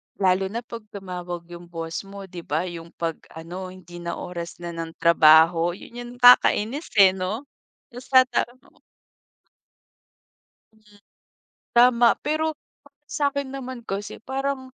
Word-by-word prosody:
Lalo 190 0 +2
na 230 +4 -5
pag 235 -1 -8 0.2
tumawag 180 -3 -6
yung 175 0 -10
boss 165 +3 -6
mo 200 0 -9
di 180 -2 -9
ba 160 +1 -2
yung 170 -2 -7
pag 165 -1 -3 0.2
ano, 175 +3 -7
hindi 175 -1 -11
na 170 0 -4
oras 170 -1 -6
na 170 - -4
ng 165 -1 -6
trabaho, 165 +1 +5
yun - - -13
yung 240 0 -8
kakainis 245 +3 +5
eh 195 -3 +8
no? 190 +6 -4 0.5
Tapos 245 +2 -11
tata 255 -3 +4 2.3
Hmm, 210 -1 -23 0.8
tama 240 0 +6 0.2
pero, 310 +1 +1 0.4
para 280 0 -23 0.2
sakin 280 -1 0
naman 260 -2 -6
kasi 200 +1 -4
parang, 270 0 -2
190 Hz, 135 wpm, -24 LUFS, 170-245 Hz, 2.3 s, eh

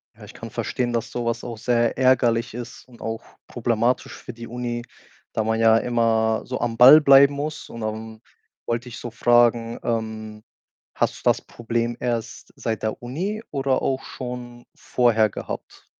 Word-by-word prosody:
Ja, - - -15
ich - - -13
kann - - -9
verstehen, 120 -1 -2
dass 115 - -2
so 120 -1 -3
was 115 0 -2
auch 120 -3 -6
sehr 115 0 +1
ärgerlich 120 -3 +3
ist 120 +1 -8
und 120 -2 -17
auch 115 0 -4 0.2
problematisch 120 +1 0
für 120 - -9
die 115 0 -9
Uni, 120 0 -4 0.5
da 110 - 0
man 110 +1 0
ja 115 0 +6
immer 115 -2 +1
so 125 - -4
am 115 -1 -2
Ball 140 +5 +10
bleiben 140 0 +7
muss. 150 +1 -5
Und 115 - -8
dann 110 +1 -5 0.4
wollte 120 +2 -3
ich 120 - -9
so 120 - -7
fragen, 120 0 +3
ähm, 110 -2 -4 0.5
hast - - 0
du - - -17
das - - +3
Problem 120 0 -3
erst 120 -2 -4
seit 110 -1 -3
der 110 +1 -2
Uni 190 - -4
oder 135 -2 0
auch 135 0 -1
schon 120 -1 -8
vorher 115 -3 +2
gehabt? - - -8
120 Hz, 175 wpm, -23 LUFS, 115-125 Hz, 0.5 s, Ball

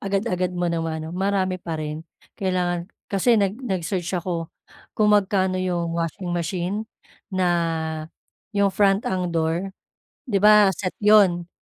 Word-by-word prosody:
agad-agad 195 -3 -1
mo 175 -1 0
ng 165 - 0
ma-ano 160 -1 -4
marami 190 -1 0
pa 165 -2 -4
rin 155 0 -4 0.4
kailangan, 180 -2 -1 0.2
kasi 225 +5 +3
nag 200 +3 0
nag-search 185 -5 -2
ako, 170 -2 -3 0.5
kung 210 -1 +4
magkano 190 -2 +2
'yong 175 -2 -1
washing 170 +2 -3
machine 175 +2 -2 0.5
na, 165 -4 -1 0.5
'yong 200 -1 +3
front 195 +1 +3
ang 185 -1 -1
door. 165 +3 -1 0.6
'Di 200 - +3
ba 210 0 +6
set 185 0 -4
'yon, 190 -5 +5
185 Hz, 135 wpm, -23 LUFS, 170-195 Hz, 0.6 s, ba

